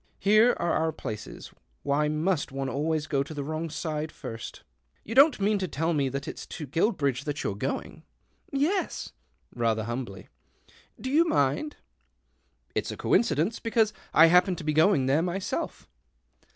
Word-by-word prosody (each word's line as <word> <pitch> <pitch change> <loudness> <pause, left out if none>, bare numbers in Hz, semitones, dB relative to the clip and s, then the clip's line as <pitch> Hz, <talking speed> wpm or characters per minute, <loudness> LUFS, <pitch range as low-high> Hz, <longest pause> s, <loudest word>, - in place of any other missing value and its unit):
(Here 215 +5 +5
are 170 - 0
our 160 0 +1
places 110 -8 -7 0.2
— 60 - -41
vhy 150 +1 +1
must 155 0 0
one 135 0 -3
always 155 +3 -1
go 140 -3 0
to 150 +3 -6
the 145 - -3
wrong 155 +3 -3
side 155 0 -3
irst 115 -6 -8 0.2
?) - - -42
You 225 - -6
don't 275 +2 +6
mean 205 +1 +2
to 185 - -2
tell 165 +2 -1
me 140 -3 +1
that 140 +2 -5
it's - - -7
to 150 - -6
jruilbridge 140 - 0
that 145 -1 -3
you're - - -1
going? 130 +8 -4 0.2
" - - -43
" - - -35
Y 275 -1 -1
yes." 370 +6 -1 0.4
Rather 115 -2 0
humbly, 115 -5 -5 0.4
" - - -28
Do 260 - -4
you 315 +4 +5
nind? 145 - +1 0.3
" - - -45
" - - -42
It's - - -2
a - - -5
coincidence, 170 +1 +1
because 225 -2 +1 0.2
I 160 - +7
happen 180 +2 +5
to 165 - -8
be 155 0 0
yoing 155 -3 +4
there 140 +4 +3
myself." 180 +2 -3
155 Hz, 190 wpm, -27 LUFS, 140-195 Hz, 0.4 s, I